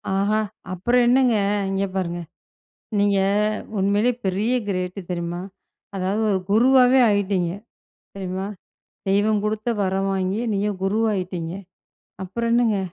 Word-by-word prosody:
ஆஹா! 205 +2 +2 0.3
அப்புறம் 240 +7 +2
என்னங்க. 250 -1 +4 0.4
இங்க 195 +1 0
பாருங்க 175 -2 -2 0.8
நீங்க 200 -1 +3 0.6
உண்மைலயே 205 +5 +2
பெரிய 200 +5 0 0.2
கிரேட்டு, 185 0 -2
தெரியுமா? 175 0 -3 0.6
அதாவது, 195 +3 -1
ஒரு 190 - +1
குருவாவே 255 +4 +5
ஆகிட்டீங்க, 200 -4 +1 0.7
தெரியுமா? 190 0 -4 0.6
தெய்வம் 205 +2 +2
குடுத்த 215 +2 -2
வரம் 195 0 0
வாங்கி, 190 +2 -1
நீங்க 200 +1 0
குருவாயிட்டீங்க. 190 -5 -1 0.7
அப்புறம் 230 +5 -2
என்னங்க. 235 -4 +3
200 Hz, 105 wpm, -23 LUFS, 185-220 Hz, 0.8 s, குருவாவே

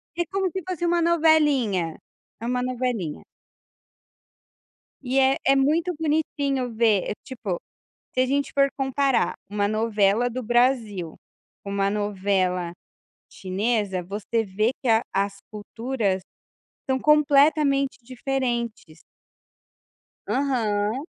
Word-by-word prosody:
É 345 - +1
como 390 0 0
se 380 - -3
fosse 355 -2 -2
uma 345 0 +2
"novelinha", 295 - +3 0.5
é - - -4
uma 250 +1 0
"novelinha". 245 -11 -3 1.8
E 260 +1 +1
é 265 0 +4
é 275 - +5
muito 315 +6 +2
bonitinho 285 -5 -1
ver 220 -4 +2
eh, - - -1
tipo, 225 -9 -5 0.5
se 255 - +2
a - - +3
gente 280 +2 0
for 275 0 +4
comparar 270 -1 +1 0.2
uma 205 0 0
novela 215 +1 +2
do 250 +1 -5
Brasil 230 -7 +1 0.5
com 200 - -6
uma 200 0 +1
novela 190 -4 0 0.6
chinesa, 200 -1 -1
você 210 +5 -2
vê 215 +4 0
que 260 - -3
a 225 -1 +4
as 195 0 0
culturas 215 -2 -2 0.7
são 265 0 +1
completamente 285 -1 +3
diferentes. 240 - -3 1.3
Aham. 230 -3 0
240 Hz, 115 wpm, -24 LUFS, 205-275 Hz, 1.8 s, é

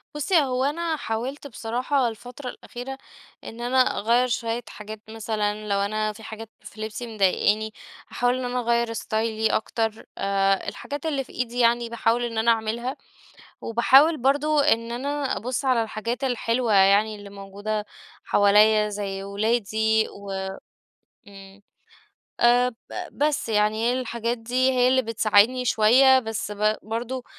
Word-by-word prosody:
بصي، 300 +5 -1
هو 255 -1 -1
أنا 325 +3 -1
حاولت 260 +5 -4
بصراحة 250 +3 -1
الفترة 245 +4 -7
الأخيرة، 260 +2 -8 0.5
إن 230 +2 -9
أنا 245 +2 0 0.2
أغير 235 +4 +2
شوية 235 0 -2
حاجات 210 0 -9
مثلًا، 215 -1 -3
لو 200 0 +1
أنا 215 +1 -1
في 220 +1 -13
حاجات 220 0 -8
في 215 - -11
لبسي 220 +2 -5
مضايقاني 210 +2 +2 0.4
هاحاول 245 +1 +1
إن 255 - -3
أنا 250 0 -2
أغير 235 -1 0
ستايلي 220 0 -1
أكتر، 225 0 -2
آآ، 195 0 +1
الحاجات 285 +2 -7
اللي 280 -4 -1
في - - -17
إيدي 245 0 -3
يعني 235 0 +3
باحاول 235 +1 0
إن 230 -2 -4
أنا 230 +1 +4
أعملها. 230 +3 -2 0.6
وباحاول 270 +7 +4
برضو 290 +4 +2
إن 235 -5 +2
أنا 280 +2 -2
أبص 250 +4 -3
على 250 -3 +3
الحاجات 230 +4 -4
الحلوة، 240 -2 0
يعني 200 +3 +4
اللي 205 -1 -11
موجودة 205 +2 -5 0.4
حواليَّ 210 +1 +4
زي 195 -1 -4
ولادي، 220 +1 +1
و 200 0 -10 1.0
امم، 195 0 -14 0.8
آآ، 245 +1 +5
ب 240 - -9 0.4
بس، 295 -4 0
يعني 210 0 +2
هي 250 +1 0
الحاجات 235 -1 -3
دي 250 +3 +1
هي 250 -1 +3
اللي 260 0 +3
بتساعدني 225 +2 +3
شوية، 255 +4 +5
بس 220 -3 -4
ب 215 +1 +1
برضو، 240 +3 -4
230 Hz, 145 wpm, -24 LUFS, 215-250 Hz, 1.0 s, آآ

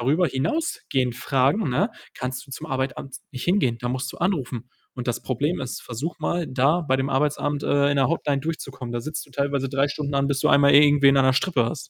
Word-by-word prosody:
darüber 150 +9 +2
hinausgehend 135 - -1
fragen, 135 +7 +1
ne, 195 - +1 0.2
kannst 125 +1 -5
du - - -16
zum 150 +4 -7
Arbeitsamt 130 -1 -4
nicht 125 - -5
hingehen. 155 - +2
Da 120 - -3
musst 130 +1 -3
du - - -12
anrufen. 135 - -2 0.3
Und 125 -1 -5
das 120 0 -2
Problem 145 +7 -1
ist, 130 -2 -5
versuch 140 +9 -5
mal, 170 +2 -1
da 140 +7 +2
bei 135 -4 +1
dem 135 +1 -1
Arbeitsamt, 145 +1 0
äh, 140 0 +2
in 145 - +1
der 135 -1 +3
Hotline 145 -4 0
durchzukommen. 135 -5 -5
Da 120 - -2
sitzt 155 +5 -5
du - - -22
teilweise 140 0 -1
3 140 +1 +1
Stunden 145 -1 -4
an, 140 0 +2
bis 135 -1 0
du - - +2
einmal 140 0 +5
irgendwen 145 -1 +6
an 135 - +5
der 130 - +4
Strippe 140 -3 +1
hast. 150 +8 -2
140 Hz, 220 wpm, -24 LUFS, 130-150 Hz, 0.3 s, irgendwen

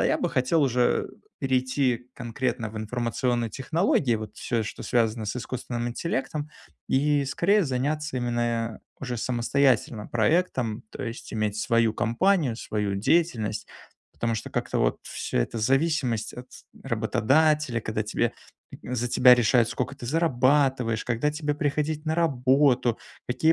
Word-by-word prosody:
А - - +3
я - - +2
бы - - -1
хотел 130 +5 +2
уже 125 -2 +2 0.3
перейти 130 -1 0
конкретно 120 -1 -3
в 110 - -10
информационные 120 +1 -1
технологии, 140 - +1
вот 110 0 -8
всё, 115 -2 -1
что 105 - -7
связано 115 -2 +1
с 100 - -2
искусственным 120 -1 -4
интеллектом, 145 +3 -3 0.4
и 145 +1 +2
скорее 190 +9 +2
заняться 145 +2 -2
именно 120 -2 -1 0.2
уже 125 -2 -3
самостоятельно 120 -2 +1
проектом. 120 - 0
То - - -7
есть 115 0 -7
иметь 105 -1 -1
свою 115 0 +2
компанию, 120 - +1
свою 105 -3 -2
деятельность. 110 -3 +1 0.5
Потому 115 -1 -1
что 110 - -5
как-то - - -2
вот - - +1
всё - - -4
это- 85 - -1
зависимость 130 -2 +1
от 125 +1 -10 0.3
работодателя, 135 +3 +2
когда 110 -1 -2
тебя 110 +2 -1 0.5
за 125 -1 -2
тебя 125 +1 +7
решают, 120 0 +3
сколько 125 +3 -3
ты 135 - -10
зарабатываешь, 130 -5 +2
когда 125 +5 0
тебе 150 -1 -2
приходить 150 +1 -1
на 155 - +1
работу, 130 -5 +3 0.3
какие 130 +6 +3
125 Hz, 140 wpm, -26 LUFS, 115-145 Hz, 0.5 s, тебя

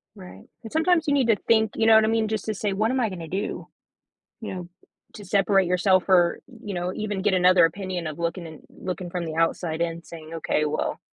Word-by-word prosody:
Right, 90 +1 -13 0.2
and 225 - -9
sometimes 325 0 +2
you 290 - +2
need 270 -4 +2
to 225 - +4
think, 220 +1 +2
you 225 - +1
know 225 - +7
what 220 0 +6
I - - 0
mean? 225 -1 +1
Just 215 -2 -3
to 220 - -2
say, 205 0 -2
"What 215 +3 0
am 260 +1 0
I 225 - +1
gonna 170 -4 -7
do?" 190 +5 -4 0.7
You 215 - -5
know, 175 -1 -7 0.4
to 205 - -10
separate 195 0 +2
yourself, 185 +1 +2
or, 175 -3 +3 0.2
you 205 -3 -5
know, 175 +1 -2
even 205 -3 -3
get 210 -2 +2
another 180 -1 +5
opinion 185 0 -4
of 155 +1 -6
looking 170 +1 -3
and 160 -2 -11
looking 185 -1 -6
from 175 0 -4
the 160 -1 -5
outside 165 0 0
in 170 0 -2
saying, 160 -1 -11
"Okay, 155 -1 0
well, 150 - -2
185 Hz, 230 wpm, -24 LUFS, 170-215 Hz, 0.7 s, know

